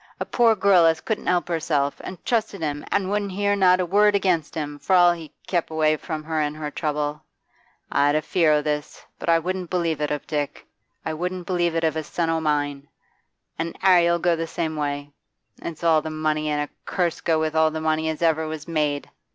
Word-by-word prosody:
A -, -, -2 dB
poor 230 Hz, -2 st, +3 dB
girl 190 Hz, -4 st, +5 dB
as 160 Hz, 0 st, +2 dB
couldn't 220 Hz, +4 st, -3 dB
help 180 Hz, -1 st, +1 dB
herself, 155 Hz, -4 st, -1 dB
as 185 Hz, -, -7 dB
trusted 215 Hz, -5 st, -1 dB
him 145 Hz, -1 st, -2 dB
an' 195 Hz, -2 st, +1 dB
wouldn't 205 Hz, -1 st, -1 dB
hear 205 Hz, +1 st, +1 dB
not 185 Hz, -2 st, +4 dB
a 180 Hz, -, +1 dB
word 205 Hz, +3 st, +4 dB
against 180 Hz, -5 st, 0 dB
him, 145 Hz, -2 st, -4 dB
for 185 Hz, +7 st, +2 dB
all 175 Hz, -1 st, +7 dB
he 165 Hz, -3 st, -6 dB
kep' 175 Hz, -3 st, -1 dB
away 155 Hz, -1 st, +2 dB
from 155 Hz, 0 st, -5 dB
her 160 Hz, 0 st, -1 dB
in 150 Hz, 0 st, -1 dB
her 150 Hz, -1 st, -5 dB
trouble. 150 Hz, -1 st, -2 dB, 0.7 s
I'd 145 Hz, +1 st, +3 dB
a 155 Hz, -, +1 dB
fear 165 Hz, -1 st, +2 dB
o' 150 Hz, -, +3 dB
this, 150 Hz, -1 st, -4 dB
but -, -, -4 dB
I 165 Hz, -, +6 dB
wouldn't 180 Hz, +1 st, -3 dB
believe 165 Hz, -4 st, -1 dB
it 150 Hz, -, 0 dB
of 150 Hz, -1 st, -3 dB
Dick; 145 Hz, -2 st, -3 dB, 0.4 s
I 160 Hz, -, -2 dB
wouldn't 180 Hz, +2 st, -4 dB
believe 175 Hz, -2 st, 0 dB
it 165 Hz, -, 0 dB
of 160 Hz, -1 st, +1 dB
a 160 Hz, -, -1 dB
son 165 Hz, +1 st, -1 dB
o' 165 Hz, 0 st, 0 dB
mine. 145 Hz, -2 st, -1 dB, 0.7 s
An' 165 Hz, 0 st, -3 dB
'Arry 175 Hz, -3 st, +6 dB
'll 170 Hz, -, +3 dB
go 170 Hz, 0 st, +2 dB
the 165 Hz, 0 st, -3 dB
same 160 Hz, -1 st, -3 dB
way. 145 Hz, -1 st, -3 dB, 0.5 s
It's 170 Hz, 0 st, -7 dB
all 160 Hz, -2 st, +4 dB
the 160 Hz, -, -5 dB
money, 155 Hz, 0 st, -1 dB
an 150 Hz, 0 st, 0 dB
a 145 Hz, -, -4 dB, 0.2 s
curse 175 Hz, -2 st, -1 dB
go 160 Hz, -1 st, +1 dB
with 155 Hz, 0 st, -1 dB
all 160 Hz, 0 st, +4 dB
the 160 Hz, 0 st, -4 dB
money 160 Hz, 0 st, 0 dB
as 160 Hz, +1 st, -3 dB
ever 160 Hz, -1 st, +2 dB
was 155 Hz, 0 st, -6 dB
made! 150 Hz, -3 st, -1 dB
160 Hz, 225 wpm, -23 LUFS, 150-175 Hz, 0.7 s, all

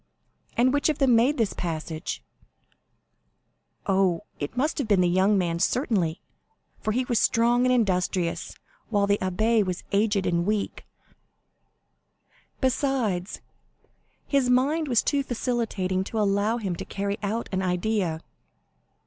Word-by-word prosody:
"And 255 Hz, +2 st, +4 dB
which 285 Hz, +2 st, +2 dB
of 300 Hz, -, 0 dB
them 265 Hz, -4 st, +4 dB
made 250 Hz, +6 st, +3 dB
this 225 Hz, -4 st, +1 dB
passage?" 160 Hz, -1 st, -4 dB, 1.6 s
"Oh, 190 Hz, -3 st, +2 dB, 0.2 s
it 145 Hz, +11 st, -5 dB
must 300 Hz, +5 st, 0 dB
have 270 Hz, -, -1 dB
been 200 Hz, -4 st, +4 dB
the 180 Hz, -, +3 dB
young 190 Hz, +4 st, +3 dB
man, 170 Hz, -2 st, 0 dB
certainly, 195 Hz, -, 0 dB, 0.6 s
for 215 Hz, -, -1 dB
he 250 Hz, +4 st, 0 dB
was 240 Hz, -3 st, +1 dB
strong 240 Hz, +2 st, +3 dB
and -, -, +3 dB
industrious, 185 Hz, -6 st, 0 dB, 0.3 s
while 205 Hz, -3 st, +2 dB
the 200 Hz, 0 st, +1 dB
abbé 215 Hz, +4 st, +2 dB
was 185 Hz, -2 st, -4 dB
aged 205 Hz, -1 st, +2 dB
and 170 Hz, 0 st, +1 dB
weak; 210 Hz, +2 st, -2 dB, 1.7 s
besides, 250 Hz, -8 st, 0 dB, 0.8 s
his 275 Hz, -3 st, +1 dB
mind 285 Hz, +6 st, +2 dB
was 240 Hz, -5 st, +2 dB
too 285 Hz, -1 st, +1 dB
vacillating 225 Hz, -7 st, -1 dB
to 225 Hz, -, -5 dB
allow 205 Hz, +2 st, +1 dB
him 195 Hz, -6 st, -3 dB
to -, -, -5 dB
carry 200 Hz, +1 st, -3 dB
out 220 Hz, +3 st, -2 dB
an 190 Hz, -1 st, -1 dB
idea." 180 Hz, -2 st, -1 dB
210 Hz, 135 wpm, -26 LUFS, 185-245 Hz, 1.7 s, And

